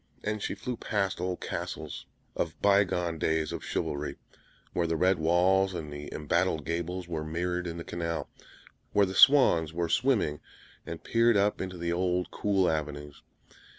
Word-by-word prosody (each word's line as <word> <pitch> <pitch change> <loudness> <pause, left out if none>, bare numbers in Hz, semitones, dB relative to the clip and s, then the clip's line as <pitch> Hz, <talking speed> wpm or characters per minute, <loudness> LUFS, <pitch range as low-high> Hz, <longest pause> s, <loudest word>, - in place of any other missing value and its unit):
And 105 0 -2
she - - -2
flew 125 -2 -5
past 100 -4 -1
old 90 0 -2
castles - - -5 0.3
of - - -3
by 100 0 +5
gone 85 -2 -2
days 80 0 0
of - - -5
chivalry, 75 +1 -3 0.6
where 85 -1 +1
the 80 - 0
red 90 +3 +3
walls 90 +4 +3
and 75 -3 -5
the 75 0 -7
embattled 80 0 0
gables 85 +2 -3
were 80 -3 -3
mirrored 90 +3 -2
in 85 0 -5
the 85 - -5
canal, 85 -1 -3 0.7
where 100 -1 +5
the 95 - -5
swans 95 - +6
were 85 0 -1
swimming, 110 - +2 0.5
and 85 - -6
peered 115 -1 +3
up 100 +1 +1
into 95 -1 -5
the 85 0 -1
old 90 0 0
cool 95 -3 +1
avenues. 75 -1 -3
90 Hz, 165 wpm, -29 LUFS, 80-95 Hz, 0.7 s, swans